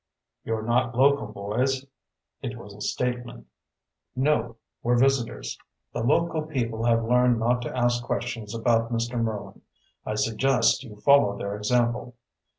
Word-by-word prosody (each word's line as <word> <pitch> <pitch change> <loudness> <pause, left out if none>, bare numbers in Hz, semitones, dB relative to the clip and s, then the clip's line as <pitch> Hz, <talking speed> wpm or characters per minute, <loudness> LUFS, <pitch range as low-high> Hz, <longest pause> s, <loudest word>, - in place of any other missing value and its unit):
"You're 110 -1 -2
not 120 +1 +1
local 140 -2 +4
boys." 115 +7 -1 0.6
It 125 -2 -5
was 105 -3 -11
a 105 - -13
statement. 125 0 -3 0.7
"No. 125 -4 +1 0.3
We're 120 +1 +2
visitors." 130 -2 0 0.3
"The - - -2
local 160 +6 +2
people 120 -7 -3
have 115 -1 +3
learned 125 0 +4
not 120 +2 +1
to 120 - -5
ask 120 0 +1
questions 115 -2 -3
about 115 0 +1
Mr. 120 +1 -1
Merlin. 110 -3 -4 0.4
I 110 - -3
suggest 115 +3 +2
you 110 -6 -11
follow 105 -3 +4
their 100 0 -4
example." 120 +3 0
120 Hz, 140 wpm, -26 LUFS, 115-125 Hz, 0.7 s, local